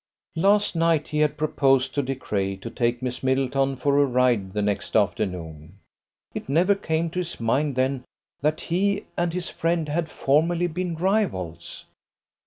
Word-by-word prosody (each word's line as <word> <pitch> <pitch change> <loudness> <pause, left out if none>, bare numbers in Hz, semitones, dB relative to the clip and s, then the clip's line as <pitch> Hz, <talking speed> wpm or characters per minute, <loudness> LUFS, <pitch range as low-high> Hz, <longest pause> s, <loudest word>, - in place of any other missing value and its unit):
Last 200 +4 +3
night 165 -2 +2
he 150 - -1
had 150 -1 +2
proposed 135 -3 +2
to 145 - +1
De 135 0 -3
Craye 100 -6 -2
to 95 - -8
take 120 +1 -1
Miss 125 -1 -3
Middleton 135 +1 +1
for 140 +2 +2
a 145 - +5
ride 125 -6 +2
the 105 +1 -1
next 105 -1 -2
afternoon. 90 -6 -1 0.6
It - - -6
never 175 +8 +4
came 165 -4 -1
to 180 - -2
his 175 -1 -4
mind 135 +5 +1
then 130 0 0 0.4
that 155 +2 0
he 195 +4 0
and 175 -1 0
his 180 +1 -3
friend 165 -1 -1
had 160 +2 -1
formerly 165 +5 +1
been 175 0 -3
rivals. 165 - -2
140 Hz, 165 wpm, -24 LUFS, 125-165 Hz, 0.6 s, a